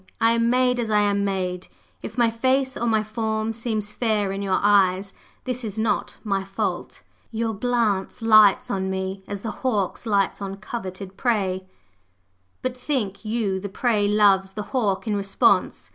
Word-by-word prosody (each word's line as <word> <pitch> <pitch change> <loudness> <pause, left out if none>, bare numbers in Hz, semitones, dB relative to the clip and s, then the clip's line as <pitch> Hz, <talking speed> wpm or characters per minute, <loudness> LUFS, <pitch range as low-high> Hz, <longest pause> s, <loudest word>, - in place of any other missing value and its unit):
I 225 - +4
am 230 0 +2
made 250 0 +2
as 230 -2 -1
I 210 -1 +3
am 200 -1 +1
made; 185 -2 -2 0.3
if - - -8
my 235 -2 +3
face 260 +3 +1
or 235 - -2
my 220 -2 +2
form 220 0 -2
seems 220 -2 -3
fair 215 -4 0
in 195 +1 -4
your 195 -1 +1
eyes, 195 -1 +3 0.3
this 255 -1 -4
is 215 -2 -5
not 220 0 -1
my 195 -3 -1
fault. 195 0 -4 0.3
Your 225 0 -2
glance 220 -2 -1
lights 215 -3 +6
on 190 -1 -1
me, 190 0 -3
as 200 -1 -5
the 225 - -3
hawk's 220 -3 -1
lights 200 -1 +1
on 195 0 -5
coveted 195 -3 -7
prey; 190 -6 0 1.0
but 255 -1 -2
think 250 -7 -3
you 215 -3 -1
the 200 +1 -6
prey 210 0 +1
loves 200 -2 +3
the 210 - -4
hawk 210 -7 0
in 215 -2 0
response? 195 -1 +1
210 Hz, 170 wpm, -23 LUFS, 195-230 Hz, 1.0 s, lights